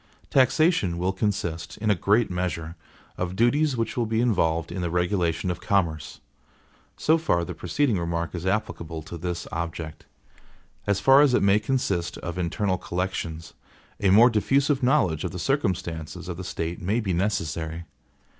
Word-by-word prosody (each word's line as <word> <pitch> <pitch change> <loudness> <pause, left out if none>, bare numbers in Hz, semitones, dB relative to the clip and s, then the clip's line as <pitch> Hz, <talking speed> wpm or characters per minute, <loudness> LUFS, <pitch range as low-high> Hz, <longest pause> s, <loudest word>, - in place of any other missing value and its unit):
Taxation 135 - +3
will 90 +2 0
consist, 90 -5 -2
in 105 0 +1
a - - +6
great 105 +3 +2
measure, 85 -2 -3 0.4
of 90 0 -2
duties 130 +5 +2
which 115 -1 -2
will 120 -2 0
be 110 0 0
involved 85 -9 +1
in 90 +1 -4
the 85 - -1
regulation 90 0 0
of 90 - -6
commerce. 85 -7 -1 0.8
So 160 +1 +3
far 85 - +1
the 90 - -5
preceding 100 - 0
remark 85 0 -2
is 85 -2 -5
applicable 85 -5 -2
to 80 - -8
this 90 0 -4
object. 80 -1 -5 0.8
As 100 -1 +2
far 135 +5 +6
as 140 -4 +4
it - - +2
may 100 +1 +5
consist 100 -8 -1
of 85 +1 -5
internal 95 +2 -1
collections, 85 -3 -4 0.5
a 100 - +2
more 115 +6 +7
diffusive 135 +6 +2
knowledge 125 - +2
of 90 - -1
the 90 - -7
circumstances 90 - -2
of 90 - -4
the 95 - -7
State 85 +1 -4
may 100 +6 0
be 100 -5 -1
necessary. 85 -3 -2
90 Hz, 165 wpm, -25 LUFS, 85-110 Hz, 0.8 s, more